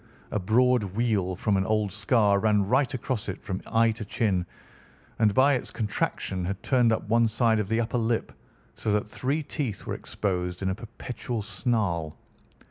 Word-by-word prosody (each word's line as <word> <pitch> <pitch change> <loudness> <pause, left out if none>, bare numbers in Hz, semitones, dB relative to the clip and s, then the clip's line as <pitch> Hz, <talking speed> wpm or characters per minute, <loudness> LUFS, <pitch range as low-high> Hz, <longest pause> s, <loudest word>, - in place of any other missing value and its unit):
A 105 - 0
broad 125 +5 +3
wheal 105 -6 +1
from 100 +2 +1
an 95 - +1
old 105 -2 +1
scar 105 0 +3
ran 105 -2 +2
right 130 +5 +2
across 130 -5 -3
it 95 - -6
from 95 -1 -4
eye 115 0 +3
to 110 0 -6
chin, 100 -4 0 0.7
and 110 -2 +4
by 140 +2 +5
its 125 - -2
contraction 100 -3 -2
had 100 +2 -4
turned 125 -4 +3
up 110 - -1
one 115 +1 +4
side 115 0 +2
of 105 - -1
the 115 +1 +1
upper 120 +1 0
lip, 115 0 0 0.4
so 110 - -2
that 105 0 0
three 140 +8 -2
teeth 135 - -4
were - - -3
exposed 90 -2 -3
in 95 - +1
a - - 0
perpetual 115 +1 -5
snarl. 100 - -1
110 Hz, 180 wpm, -27 LUFS, 100-120 Hz, 0.7 s, by